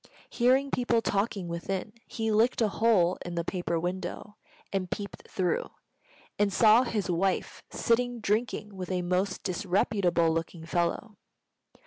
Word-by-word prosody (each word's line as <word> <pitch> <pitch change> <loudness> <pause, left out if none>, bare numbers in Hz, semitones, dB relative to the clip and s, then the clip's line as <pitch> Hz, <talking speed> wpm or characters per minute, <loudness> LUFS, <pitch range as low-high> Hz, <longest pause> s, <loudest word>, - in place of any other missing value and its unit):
Hearing 260 +3 +3
people 240 -2 +1
talking 200 -2 -1
within, 185 +4 -4
he 225 -2 -2
licked 225 +4 +3
a 220 -3 +3
hole 195 -5 +3
in 175 -1 -6
the 170 - -1
paper 175 -2 -2
window 185 +4 -4 0.4
and 185 -2 -1
peeped 200 +2 -6
through, 180 -3 -1 0.7
and 205 -1 +3
saw 220 +3 +6
his 220 -6 -1
wife 185 +2 -1
sitting 245 +1 0
drinking 215 -1 -1
with 185 -1 -6
a 180 -1 0
most 185 +2 -1
disreputable 180 -2 +1
looking 165 0 -3
fellow. 175 +6 -1
195 Hz, 135 wpm, -28 LUFS, 175-225 Hz, 0.7 s, saw